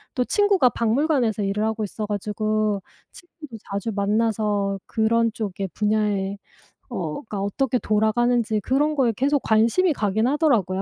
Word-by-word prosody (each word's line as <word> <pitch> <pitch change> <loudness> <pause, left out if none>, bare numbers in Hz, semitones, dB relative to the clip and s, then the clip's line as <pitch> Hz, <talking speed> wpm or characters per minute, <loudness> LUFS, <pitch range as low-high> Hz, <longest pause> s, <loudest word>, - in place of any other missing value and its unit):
또 250 -3 +1
친구가 400 -9 +3
박물관에서 235 -2 +1
일을 200 +2 -1
하고 220 0 -1
있어 210 +2 -5
가지고 210 0 -1 0.3
친구도 310 -9 -12
자주 200 +3 -3
만나서 205 -1 0
그런 230 +1 +1
쪽의 195 -3 -4
분야에 210 -2 0 0.5
어 170 -11 -4
가 205 - -4
어떻게 245 +6 0
돌아가는지 220 +1 +1
그런 290 +7 +1
거에 250 -5 +2
계속 280 +1 +1
관심이 230 +11 +3
가긴 220 -1 0
하더라고요. 240 - +1
220 Hz, 325 characters per minute, -23 LUFS, 205-250 Hz, 0.5 s, 친구가